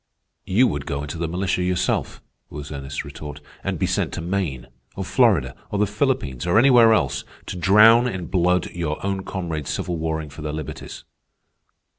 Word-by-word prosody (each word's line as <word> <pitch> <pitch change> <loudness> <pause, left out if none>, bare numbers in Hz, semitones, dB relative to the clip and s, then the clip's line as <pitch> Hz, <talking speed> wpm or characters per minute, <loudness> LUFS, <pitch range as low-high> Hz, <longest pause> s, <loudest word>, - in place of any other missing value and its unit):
"You 110 +8 +4
would 70 - -2
go 70 +1 -2
into 75 +3 -6
the 85 - -1
militia 90 +2 -1
yourself," 90 0 -1 0.3
was 75 0 -8
Ernest's 70 -1 -5
retort, 75 +1 -8 0.2
"and - - -2
be - - 0
sent - - 0
to 85 - -4
Maine, 85 -8 -2 0.3
or - - -4
Florida, - - +3 0.2
or 105 - -2
the 105 - +3
Philippines, 105 - -1
or 85 - +3
anywhere 120 -2 +7
else, 70 - +1 0.2
to - - -6
drown 110 +7 +6
in 95 -7 -4
blood 90 0 +1
your 80 -3 -3
own 100 -1 -1
comrades 80 -8 -4
civil 90 -1 -2
warring 80 -2 -3
for 75 - -10
their 75 0 -4
liberties. 75 -2 -7
85 Hz, 175 wpm, -23 LUFS, 75-100 Hz, 0.3 s, anywhere